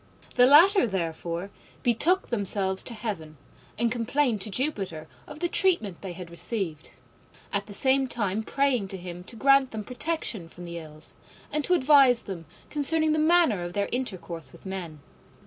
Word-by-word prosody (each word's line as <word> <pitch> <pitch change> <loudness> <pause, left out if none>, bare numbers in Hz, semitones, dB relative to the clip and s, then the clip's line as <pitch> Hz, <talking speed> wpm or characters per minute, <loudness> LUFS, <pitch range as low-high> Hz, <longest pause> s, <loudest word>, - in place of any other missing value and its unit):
The 245 - +6
latter, 340 - +7
therefore, 170 0 -3 0.3
betook 320 - +2
themselves 195 -3 0
to 235 - -7
heaven 165 -9 -5 0.4
and 235 0 +1
complained 240 -1 +1
to 215 - +1
Jupiter 195 - -2 0.2
of 295 +1 -10
the 350 - +2
treatment 335 - +1
they 190 -3 -6
had 175 -1 -9
received, 170 -3 -3 0.6
at 200 0 -1
the 205 - -9
same 265 +3 +2
time 210 -4 -1
praying 250 -4 0
him 180 -2 -6
to 230 - -11
grant 275 +2 +4
them 220 -3 -5
protection 250 - -3
from 175 - -12
the 170 -1 -6
Ills, 155 -1 -6 0.4
and 300 0 -1
to 360 - +3
advise 270 -5 +5
them 170 -5 -7 0.2
concerning 310 +2 +2
the 310 - +2
manner 315 - +4
of 175 0 -5
their 200 +1 -1
intercourse 185 -10 -4
with - - -17
men. 175 -6 -6
215 Hz, 165 wpm, -27 LUFS, 180-275 Hz, 0.6 s, latter